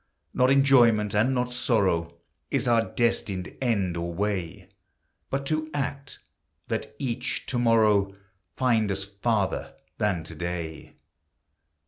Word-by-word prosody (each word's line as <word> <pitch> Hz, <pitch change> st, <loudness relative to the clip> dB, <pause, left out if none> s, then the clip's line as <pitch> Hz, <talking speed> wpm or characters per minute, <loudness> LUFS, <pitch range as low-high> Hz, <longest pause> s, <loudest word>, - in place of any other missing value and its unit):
Not 125 Hz, 0 st, +3 dB
enjoyment, 120 Hz, -7 st, +5 dB
and 110 Hz, +5 st, +3 dB
not 125 Hz, 0 st, -1 dB
sorrow, 95 Hz, -9 st, +1 dB, 0.3 s
Is -, -, 0 dB
our 115 Hz, -1 st, +3 dB
destined 100 Hz, -6 st, -1 dB
end 100 Hz, -8 st, 0 dB
or 85 Hz, 0 st, -3 dB
way; 95 Hz, -2 st, -3 dB, 0.6 s
But 140 Hz, +1 st, -2 dB
to 155 Hz, +2 st, -1 dB
act, 140 Hz, 0 st, -4 dB, 0.5 s
that -, -, -3 dB
each 125 Hz, -1 st, -3 dB
to 130 Hz, -3 st, -1 dB
morrow 105 Hz, -4 st, +3 dB, 0.4 s
Find 115 Hz, -5 st, +2 dB
us 95 Hz, 0 st, -1 dB
farther 100 Hz, 0 st, -1 dB, 0.2 s
than 100 Hz, -6 st, 0 dB
to 80 Hz, -, -9 dB
day. 85 Hz, -1 st, -5 dB
110 Hz, 120 wpm, -26 LUFS, 95-125 Hz, 0.6 s, enjoyment